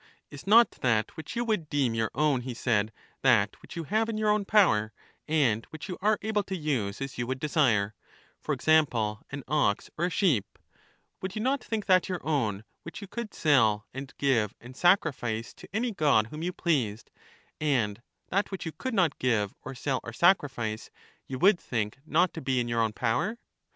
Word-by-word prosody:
Is 145 +5 -11
not 230 +3 +7
that 115 -4 +1
which 160 - -7
you 240 +1 -1
would 200 -9 -1
deem 135 -5 +1
your 110 -1 0
own, 145 -2 +2
he 125 -1 -6
said, 110 -3 +1 0.3
that 110 -6 +3
which - - -12
you 165 - -3
have 220 +7 0
in 220 - -2
your 215 -1 +2
own 210 -1 +1
power, 140 - +3 0.3
and 135 -8 +2
which 155 +2 -9
you 180 - -6
are 210 +1 +3
able 215 -1 +1
to 190 - -4
use 125 - -2
as 135 -3 -5
you 120 - -1
would 130 +1 -3
desire, 120 -9 +2 0.5
for - - -4
example, 120 -9 +2
an 140 -1 -6
ox 135 -8 +1
or 170 - +2
a - - 0
sheep 155 - +1 0.3
— - - -38
would 190 0 -4
j^ou 215 - -3
not 270 +2 0
think 220 -2 -3
that 185 -2 +3
your 180 -2 -2
own 110 -10 0 0.2
which 170 - -8
you 200 - -8
could 235 +1 -6
sell 115 -9 +3
and 135 +1 -7
give 115 -7 +1
and 125 +2 -12
sacrifice 130 - +1
to - - -14
any 230 +3 -1
god 145 - +3
whom 155 - -6
you 175 +2 -1
pleased, 130 - -1 0.5
and 120 -8 0 0.3
that 200 +3 0
which 190 -2 -6
you 165 - -3
could 260 +7 -4
not 175 -7 +2
give 105 -6 +1
or 135 - -8
sell 130 0 -1
or 120 - -6
sacrifice 130 - +1 0.4
you 130 - -4
would 185 +4 +5
think 110 0 -3
not 175 +4 +2
to 165 - -6
be 130 -1 0
in 120 - -1
your 115 -1 0
own 110 -1 +1
power? 125 - -1
140 Hz, 200 wpm, -28 LUFS, 115-185 Hz, 0.5 s, not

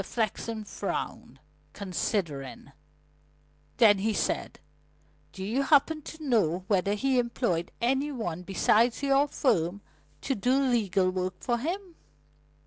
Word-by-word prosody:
Mr. - - -9
Flexen 225 0 -2
frowned, 195 -9 -5 0.3
considering; 180 - -3 1.1
then 205 -4 +6
he 215 +3 0
said: - - -2 0.7
"Do 190 - -7
you 225 +8 0
happen 300 +3 +3
to 315 +2 -10
know 195 - +1
whether 200 0 +2
he 260 +4 +1
employed 235 -8 -1
any 270 +5 +1
one 180 - -4
besides 215 +7 +2
your 275 +1 +3
firm 195 - 0 0.4
to 270 - -1
do 255 +4 +2
legal 205 -8 +2
work 185 0 -2
for 240 -1 -1
him?" 355 +6 -4
220 Hz, 125 wpm, -28 LUFS, 185-270 Hz, 1.1 s, then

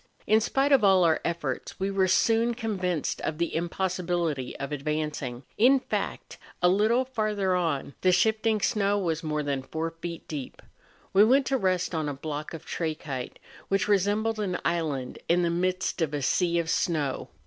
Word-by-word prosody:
In 215 +1 +4
spite 270 +5 +1
of 270 -5 +5
all 190 -2 +5
our 160 -2 +3
efforts, 150 -6 -3
we 195 +1 -1
were 195 -1 +2
soon 230 +5 +3
convinced 185 - -2
of 155 - -3
the 170 0 -1
impossibility 175 -5 -2
of 140 +1 -5
advancing; 150 -4 -3 0.2
in 260 +5 +6
fact, - - -4 0.2
a 180 - +4
little 220 +7 +3
farther 215 -6 0
on 165 -6 -1
the 185 - +4
shifting 220 +3 +2
snow 205 -2 +1
was 165 -5 -1
more 150 -1 -2
than 140 -2 -1
four 160 +4 -4
feet 165 0 -7
deep. 145 -4 -7 0.5
We 195 +2 +7
went 265 +5 +4
to 270 - +1
rest 185 -2 0
on 155 -2 -1
a 145 - -4
block 150 +1 -5
of 160 - -10
trachyte, 150 -6 -4 0.3
which 195 +1 +1
resembled 210 +2 +1
an 190 -4 -1
island 155 -7 -1
in 175 +1 +3
the 170 - +1
midst 185 +1 -1
of 150 -2 0
a 145 - -3
sea 170 +4 +2
of 170 -1 0
snow. 150 -6 -1
175 Hz, 175 wpm, -27 LUFS, 155-205 Hz, 0.5 s, We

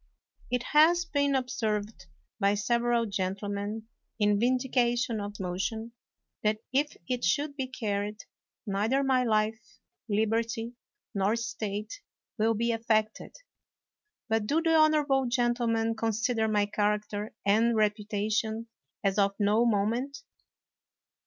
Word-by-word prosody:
It 250 -1 0
has 340 +4 +5
been 285 -3 +1
observed 220 - -2 0.3
by 200 +1 +3
several 235 +2 +1
gentlemen, 200 +2 -3 0.3
in 205 -1 +3
vindication 245 -2 +1
of 205 0 -5
this - - -13
motion, 195 +5 -3 0.5
that 215 0 +1 0.2
if 290 +3 +1
it 250 -2 -2
should 285 - +1
be 265 -2 -3
carried, 210 -4 -3 0.4
neither 220 +7 +1
my 260 -2 +3
life, 220 -1 -1 0.3
liberty, 225 +2 0 0.4
nor 200 +1 +1
estate 220 - -4 0.4
will 225 +1 +3
be 235 +2 +1
affected. 220 -1 0 0.9
But 220 -2 0
do 305 +6 +2
the 325 0 +2
honorable 300 -4 +4
gentlemen 240 -2 +1
con 225 0 -1
sider 225 0 0
my 210 -1 +2
character 210 0 -1
and 225 +4 +3
reputation 215 +1 0 0.3
as 195 0 +1
of 200 0 +2
no 215 +3 +3
mo 205 -3 +2
ment? 265 +6 -3
225 Hz, 120 wpm, -29 LUFS, 210-245 Hz, 0.9 s, has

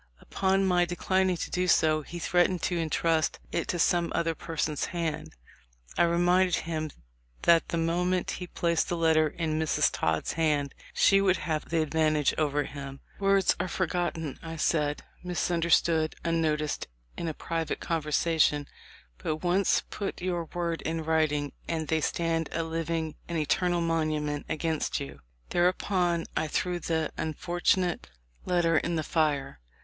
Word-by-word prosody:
Upon 195 0 +1
my 180 -2 +3
declining 185 +1 +1
to - - -5
do 180 0 0
so 155 -3 +4
he 170 +4 -8
threatened 175 +1 +1
to 180 - 0
intrust 165 -1 +1
it 170 - -1
to 175 - -1
some 170 0 +2
other 165 -1 +1
person's 155 -2 -2
hand. 165 -3 -4 0.6
I - - +4
reminded 175 +1 +3
him 155 -2 -2 0.5
that 170 -1 +4
the 170 - -1
moment 175 +2 0
he 180 - -4
placed 170 -1 0
the 175 - -1
letter 160 -1 +4
in 155 0 -2
Miss 160 -2 +2
Todd's 80 -1 -1
hand, 150 -4 +1 0.2
she 195 0 +4
would 190 -2 +3
have 155 -2 -3
the 165 -1 +2
advantage 155 -2 +2
over 145 -1 +1
him. 140 -1 -8 0.2
'Words 195 -1 +3
are 180 - -1
forgotten,' 175 -5 -2
I 165 0 -6
said, 150 -2 0 0.2
'misunderstood, 170 -2 +1
unnoticed 155 -2 0 0.3
in 170 - -4
a 160 - -3
private 165 -1 -3
conver 165 -3 -2
sation, 150 -2 +2 0.5
but 155 +2 -3
once 180 +2 +2
put 200 - -4
your 175 -2 -2
words 170 0 -3
in 160 0 -2
writing 155 -2 +1 0.2
and 160 -3 -2
they 160 -1 +2
stand 165 0 0
a 165 - 0
living 165 -1 -2
and 170 - -2
eternal 175 +3 +1
monument 155 -3 -1
against 160 0 -1
you.' 70 0 -7 0.3
Thereupon 175 -1 +1
I 155 - 0
threw 175 +3 -1
the 160 -2 -1
unfortunate 175 - 0 0.4
letter 170 -3 +3
in 170 - -2
the 160 - -1
fire. 145 - 0
165 Hz, 150 wpm, -28 LUFS, 155-175 Hz, 0.6 s, so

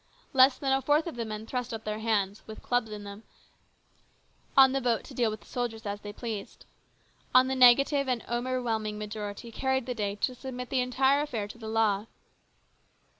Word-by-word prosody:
Less 260 0 +6
than 270 -2 -1
a 270 - +2
fourth 295 +4 +2
of 335 - -5
the 235 -1 -3
men 215 0 -6
thrust 250 0 -3
up 225 -1 -5
their 215 0 -3
hands, 210 -3 0
with 220 - -10
clubs 245 -2 0
in 210 -1 -7
them, 200 +1 -9 1.4
on 265 -1 +8
the 270 0 0
vote 235 -3 +1
to - - -12
deal 240 -3 +1
with 215 0 -6
the - - -19
soldiers 235 -2 -4
as 205 0 -4
they 205 - -7
pleased. 215 -2 -7 0.7
On 255 0 +8
the 265 - -1
negative 275 +3 +5
an 250 -3 -1
overwhelming 240 -3 -2
majority 210 +1 -6
carried 265 +1 -1
the 250 - -3
day 205 -3 -2
to 255 +5 -1
submit 250 0 -7
the 260 -2 +2
entire 265 +3 +2
affair 230 -9 -3
to 235 - -12
the 220 -1 -6
law. 220 -2 +1
235 Hz, 195 wpm, -29 LUFS, 215-255 Hz, 1.4 s, on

